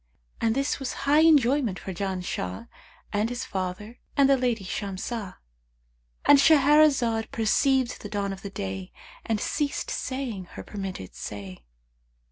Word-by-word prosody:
And 225 0 +2
this 275 +1 0
was 270 -2 -3
high 290 +2 +5
enjoyment 280 - +4
for 190 - -6
Janshah 180 - -4 0.5
and 210 +2 +1
his 245 +1 -4
father 195 +4 -5 0.2
and 280 -1 +6
the 275 - +5
lady 245 -5 0
Shamsah."—And - - -2
Shahrazad 280 -6 +4
perceived 255 +3 +1
the 205 - -7
dawn 200 -1 -2
of 190 - -10
day 95 -1 -5 0.3
and 220 -2 -1
ceased 295 - -2
saying 260 - -3
her - - -7
permitted 190 - -6
say. 95 - -8
215 Hz, 125 wpm, -26 LUFS, 180-265 Hz, 0.5 s, and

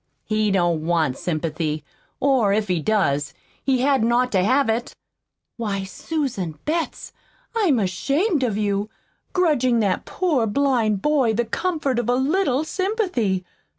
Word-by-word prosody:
"He 215 -1 +1
don't 175 -5 +1
want 160 -5 +1
sympathy 155 -2 -2 0.4
or, 260 -7 +3
if 210 -1 0
he 175 -3 +1
does, 150 -9 0 0.3
he 260 -2 +2
hadn't 260 -4 +2
ought 250 +1 +2
to 185 -3 +2
have 260 +6 +3
it." 225 +2 -1 0.6
"Why, 205 -4 -2
Susan 195 - -3
Betts, 325 +2 -2 0.4
I'm 380 - +3
ashamed 275 - 0
of 225 -5 0
you 205 0 -1 0.4
grudgin' 260 -10 +2
that 195 -3 0
poor 300 -11 0
blind 225 -4 +1
boy 275 -7 +2
the 240 +2 +1
comfort 285 -1 -1
of 240 -1 -2
a 245 - +3
little 280 +1 +1
sympathy! 345 - -1
235 Hz, 140 wpm, -22 LUFS, 195-280 Hz, 0.6 s, or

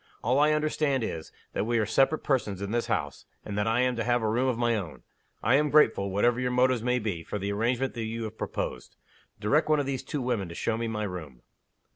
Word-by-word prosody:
All 125 +4 +2
I 150 +1 +5
understand 150 -4 +1
is, 80 -7 -5 0.2
that - - -1
we 120 0 +2
are 110 - +2
separate 135 +8 +2
persons 115 -9 0
in 100 +1 -4
this 120 0 0
house, 90 -11 -2 0.2
and 105 - -5
that 105 +1 0
I 115 +2 +2
am 125 0 +1
to 115 - 0
have 120 -1 +1
a - - +1
room 125 +4 +1
of 125 -3 0
my 120 -1 +2
own. 95 -8 -5 0.4
I 115 - +3
am 150 +1 +2
grateful, 110 -9 +4
whatever 120 +5 +2
your 125 0 0
motives 125 -1 +2
may 125 +1 +1
be, 100 -8 -3
for 105 - -4
the 100 0 -2
arrangement 120 +5 0
that 115 -2 -4
you 115 +1 -4
have 110 - -6
proposed. - - -4 0.4
Direct 145 +10 +2
one 155 -1 +4
of 145 - 0
these 135 -2 -2
two 145 -4 -4
women 115 -8 -1
to 85 - -8
show 110 - -1
me 115 +1 -2
my 105 -1 -2
room." 80 -10 -7
115 Hz, 245 wpm, -28 LUFS, 105-130 Hz, 0.4 s, I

